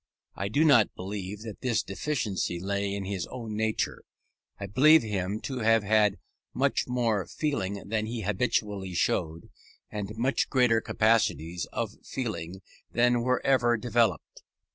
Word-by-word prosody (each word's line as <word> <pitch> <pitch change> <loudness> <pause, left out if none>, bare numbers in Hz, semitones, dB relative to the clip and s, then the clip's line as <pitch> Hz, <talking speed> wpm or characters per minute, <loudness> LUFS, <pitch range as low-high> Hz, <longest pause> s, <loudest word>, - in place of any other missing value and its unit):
I 100 - -3
do 140 +10 +2
not 120 -9 +5
believe 100 +2 -6
that 110 -3 -8
this 125 -3 +1
deficiency 100 -6 -2
lay 100 +2 -2
in 100 -1 -4
his 95 -2 -3
own 115 -4 -6
nature. 110 0 -1 0.6
I 100 - -4
believe 150 - +6
him 100 -1 -2
to 130 -2 -4
have 115 -1 +3
had 105 -1 +3 0.4
much - - +1
more 115 -6 0
feeling 100 -11 -3
than 110 +1 -1
he 115 0 -4
habitually 100 -2 -1
showed, 80 0 -1 0.4
and 105 +1 -5
much 130 +4 +1
greater 125 -4 +3
capacities 105 -8 +1
of 115 -2 -3
feeling 95 -7 -5 0.3
than 120 0 +3
were 125 +2 0
ever 120 -3 +3
developed. 115 -5 0
110 Hz, 140 wpm, -28 LUFS, 100-120 Hz, 0.6 s, believe